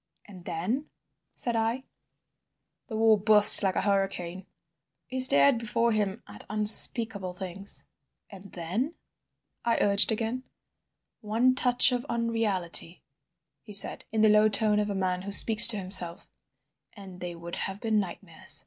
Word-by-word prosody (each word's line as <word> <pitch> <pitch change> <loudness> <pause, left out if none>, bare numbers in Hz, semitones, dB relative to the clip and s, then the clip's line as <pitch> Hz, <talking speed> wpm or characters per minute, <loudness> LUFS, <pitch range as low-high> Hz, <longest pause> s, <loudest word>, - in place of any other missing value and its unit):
"And 185 -4 -16
then?" 220 - -6 0.5
said 240 -1 -3
I. 225 +3 -3 1.0
"The 220 - -9
war 220 -1 +1
burst 210 0 +7
like 190 -2 -3
a - - -3
hurricane." 195 -2 -5 0.6
He 260 - -8
stared 140 - +4
before 230 +1 -3
him 210 0 -4
at 105 0 -11
unspeakable 210 -2 +1
things. 190 +2 -6 0.4
"And 195 -1 -16
then?" 195 - -6 0.7
I 235 - -2
urged 200 +2 +2
again. 230 +4 -6 0.7
"One 230 +3 -1
touch 250 0 +3
of 245 -1 -4
unreality," 215 -7 -2 0.6
he 210 - -15
said, 200 - +4
in 220 0 -3
the 215 - +3
low 210 +1 +2
tone 210 0 +1
of 210 0 -4
a 200 - -5
man 185 -1 -4
who 195 - -10
speaks 215 +2 +5
to 230 -2 +4
himself, 185 -3 0 0.7
"and 190 -3 -15
they 175 -1 -9
would 170 +1 -10
have 195 +1 -5
been 220 -2 -2
nightmares. 180 -3 -2
210 Hz, 145 wpm, -25 LUFS, 185-225 Hz, 1.0 s, burst